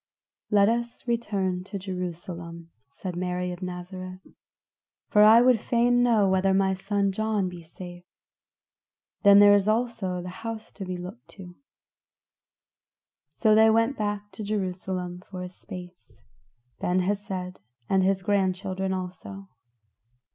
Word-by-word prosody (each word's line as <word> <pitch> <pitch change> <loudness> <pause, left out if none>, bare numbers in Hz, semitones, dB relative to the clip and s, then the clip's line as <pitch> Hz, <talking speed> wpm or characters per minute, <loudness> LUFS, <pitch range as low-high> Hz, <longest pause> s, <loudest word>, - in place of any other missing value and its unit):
"Let 200 -2 +5
us 235 +2 -2
return 200 -6 -1
to 200 - -6
Jerusalem," 175 -3 -6 0.2
said 185 -2 -7
Mary 180 0 -2
of 175 +1 -8
Nazareth, 185 +1 -7 0.8
"for 210 - +5
I 220 +2 +8
would 250 -2 +5
fain 245 +2 +2
know 225 -5 +4
whether 190 0 +2
my 190 0 +2
son 195 +1 0
John 215 -1 0
be 175 -1 -9
safe; 175 +2 -11 1.2
then 200 -1 +7
there 205 0 +8
is 200 0 +3
also 215 -5 0
the 180 +1 -6
house 225 -1 -6
to 195 - -7
be 185 -1 -4
looked 180 +7 -9
to." 180 -2 -10 1.8
So 215 -2 +3
they 220 +1 +6
went 230 +4 +3
back 205 -1 -3
to 190 +3 -7
Jerusalem 185 -3 -3
for 185 -2 -6
a 180 - -6
space. 180 - -12 0.6
Ben 180 +1 +1
Hesed 190 -1 -3 0.3
and 190 0 +3
his 190 0 +1
grandchildren 190 -1 0
also. 190 +1 -7
190 Hz, 135 wpm, -26 LUFS, 180-210 Hz, 1.8 s, I